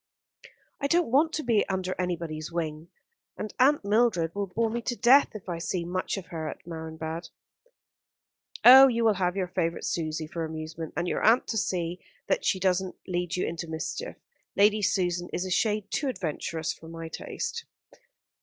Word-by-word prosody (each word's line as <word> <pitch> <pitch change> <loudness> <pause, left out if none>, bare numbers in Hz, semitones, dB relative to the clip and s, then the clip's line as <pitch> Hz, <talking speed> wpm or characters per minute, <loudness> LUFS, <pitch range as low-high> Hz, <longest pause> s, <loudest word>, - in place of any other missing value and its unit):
"I 280 - 0
don't 340 -3 +2
want 305 +5 +4
to 310 - -2
be 230 -4 +3
under 185 -1 -1
anybody's 170 -3 -3
wing; 160 -1 -3 0.5
and 215 - -5
Aunt 275 -2 +4
Mildred 205 -6 +2
will 200 0 -2
bore 225 +4 -1
me 235 +1 -2
to 240 +1 -2
death 255 +1 +5
if 205 - -9
I 170 -2 -3
see 170 0 -2
much 185 +3 -2
of 190 - -8
her 160 -2 -4
at - - -10
Marienbad." 160 0 -6 1.4
"Oh, 265 +2 +11
you 235 -2 +1
will 220 - +5
have 180 -2 0
your 190 -2 0
favourite 170 -2 -2
Susie 160 -1 -2
for 165 +1 -5
amusement, 160 0 -6
and 175 - 0
your - - -1
aunt 230 +4 +5
to 220 - -1
see 175 -2 -2 0.2
that - - 0
she 200 -3 +1
doesn't 185 0 0
lead 175 -1 -2
you 180 - 0
into 170 0 -4
mischief. 160 - -5 0.4
Lady 210 +1 +4
Susan 180 -3 0
is 180 - -2
a 185 - -5
shade 210 +1 0
too 280 - -1
adventurous 165 - -3
for 165 - -14
my 165 0 -7
taste." 465 - -5
180 Hz, 180 wpm, -27 LUFS, 165-220 Hz, 1.4 s, Oh